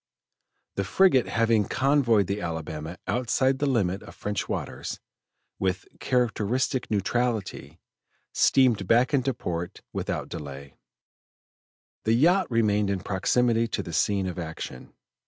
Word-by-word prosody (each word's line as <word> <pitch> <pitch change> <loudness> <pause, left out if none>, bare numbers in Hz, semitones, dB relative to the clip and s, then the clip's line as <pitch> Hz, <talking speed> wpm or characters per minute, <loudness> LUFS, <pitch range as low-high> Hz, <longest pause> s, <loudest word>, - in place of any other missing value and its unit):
The 100 - +1
frigate 130 - +4
having 115 0 +2
convoyed 130 -6 +3
the 100 +3 -3
Alabama 80 0 -5
outside 130 +2 +1
the 145 - +1
limit 100 -7 0
of - - -12
French 105 -1 -3
waters, - - -4 0.6
with 95 0 -1
characteristic 125 +1 0
neutrality, 105 - -1 0.5
steamed 130 -5 +3
back 120 +5 +3
into 135 -1 +2
port 85 -5 -5
without - - -3
delay; 70 -3 -8 1.3
the 110 - +2
yacht 175 +10 +4
remained 105 -4 +2
in 100 -2 -1
proximity 115 +5 +1
to - - -3
the 85 - -8
scene 100 +3 +1
of 90 0 -4
action. 80 -6 -7
105 Hz, 120 wpm, -26 LUFS, 90-125 Hz, 1.3 s, frigate